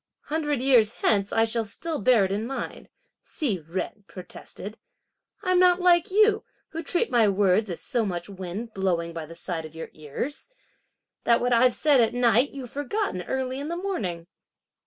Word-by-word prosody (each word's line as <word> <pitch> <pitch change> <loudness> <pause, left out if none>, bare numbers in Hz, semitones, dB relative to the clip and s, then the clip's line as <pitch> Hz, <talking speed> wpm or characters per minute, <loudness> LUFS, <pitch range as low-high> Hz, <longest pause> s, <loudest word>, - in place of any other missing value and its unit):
"Hundred 295 -4 -1
years 240 -5 +5
hence 200 -2 +1
I 225 - +3
shall 225 0 -1
still 310 +9 -3
bear 225 -2 +4
it 190 - -3
in 210 +3 -2
mind," 270 - -6 0.3
Hsi 230 - -2
Jen 175 +6 -5
protested; 200 +3 -9 0.6
"I'm 365 -2 +3
not 360 0 +5
like 350 -1 +4
you, 430 +2 +4 0.3
who 325 - -5
treat 355 +6 0
my 230 -3 +5
words 200 +1 +2
as 175 - -5
so 235 - -1
much 175 -4 -3
wind 195 +4 -6
blowing 170 -3 -1
by 165 -2 -6
the 165 - -11
side 165 -2 -4
of 155 0 -11
your 160 - -7
ears, 155 - -6 0.7
that 235 - +4
what 245 0 +1
I've 245 +1 +4
said 290 -4 +4
at 225 +1 +1
night, 245 +2 +4
you've 260 -4 -8
forgotten 290 - -2
early 260 +5 -3
in 285 - -4
the 340 +2 -3
morning." 200 - -3
230 Hz, 180 wpm, -26 LUFS, 190-290 Hz, 0.7 s, years